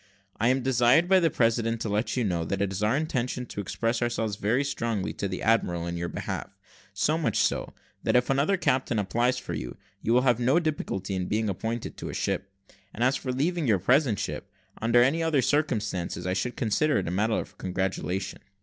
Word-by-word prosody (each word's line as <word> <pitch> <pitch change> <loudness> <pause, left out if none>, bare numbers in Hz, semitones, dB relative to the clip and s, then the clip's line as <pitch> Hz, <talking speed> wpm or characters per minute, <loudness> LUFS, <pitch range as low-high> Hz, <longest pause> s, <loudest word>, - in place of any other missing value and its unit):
I 115 - +2
am 130 +1 +2
desired 130 +6 +4
by 190 0 +6
the 165 -2 +3
president 115 -2 +1
to 110 - -2
let 105 +5 -1
you 125 - +2
know, 90 -5 0
that 100 +3 -2
it 100 -1 0
is 95 - -4
our 110 +6 +2
intention 125 -5 -2
to 105 - -5
express 115 +4 -1
ourselves 115 -3 -1
very 115 +7 +1
strongly 115 -7 -2
to 100 - -3
the 95 -1 -5
admiral 90 -7 +2
in 85 0 -3
your 85 0 -3
behalf; - - -4 0.4
so 150 - +1
much 160 - 0
so, - - 0 0.3
that - - +1
if 125 0 +4
another 140 +9 +2
captain 130 -8 +1
applies 120 +5 +1
for 105 -8 -5
you, 65 -6 -5 0.2
you 115 - 0
will 125 +1 +5
have 125 -3 +3
no 130 +7 +3
difficulty 125 - -2
in 90 -1 -2
being 110 0 0
appointed 110 +5 -4
to - - -6
a - - -5
ship; 95 0 -2 0.4
and 115 - -1
as 130 +2 +3
for 130 - -3
leaving 155 +4 0
your 105 -4 +4
present 125 - +3
ship, - - -4 0.3
under 120 +2 +5
any 145 +6 +2
other 160 -5 +2
circumstances, 105 - -1
I 90 - 0
should 120 +6 -2
consider 140 +6 +2
it - - -1
a - - -2
matter 105 +5 +1
of - - -5
congratulation." 95 0 -2
115 Hz, 215 wpm, -27 LUFS, 100-130 Hz, 0.4 s, by